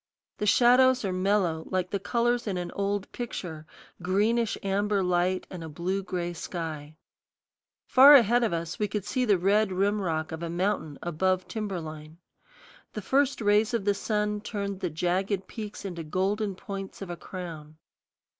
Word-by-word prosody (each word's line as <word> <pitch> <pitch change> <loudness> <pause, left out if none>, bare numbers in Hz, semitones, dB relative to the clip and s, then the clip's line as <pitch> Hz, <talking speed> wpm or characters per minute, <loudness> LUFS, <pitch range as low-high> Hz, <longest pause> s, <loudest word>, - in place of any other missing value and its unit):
The 210 - -1
shadows 250 +2 +5
are 190 - -1
mellow, 185 -4 0
like 185 -1 -1
the 200 - -1
colors 235 +3 0
in 190 -3 -1
an 175 -1 -4
old 200 0 -2
picture 170 -10 -6 0.3
greenish 210 +5 +1
amber 200 0 +1
light 180 +1 +1
and 180 -3 -7
a 160 - -7
blue 180 +5 -2
gray 175 -3 -3
sky. 160 -3 -6 0.9
Far 275 +3 +9
ahead 240 -1 +5
of 225 - +1
us 170 0 -3
we 210 - +1
could 205 -1 -4
see 255 +2 0
the 205 -4 +4
red 200 +3 +2
rim 200 +3 +1
rock 160 -2 -2
of 160 0 -6
a 170 - -3
mountain 175 -4 -1
above 185 +2 0
timber 210 -5 -3
line. 155 0 -9 0.8
The 215 - -5
first 275 +4 +1
rays 210 +2 +3
of 210 -4 -2
the 205 - +3
sun 210 0 -1
turned 200 -2 -4
the 180 - -2
jagged 185 +4 -1
peaks 210 -2 -7
into 175 -3 -5
golden 195 +5 -1
points 195 0 -7
of 180 - -7
a - - -4
crown. 165 -4 -8
195 Hz, 170 wpm, -27 LUFS, 175-210 Hz, 0.9 s, Far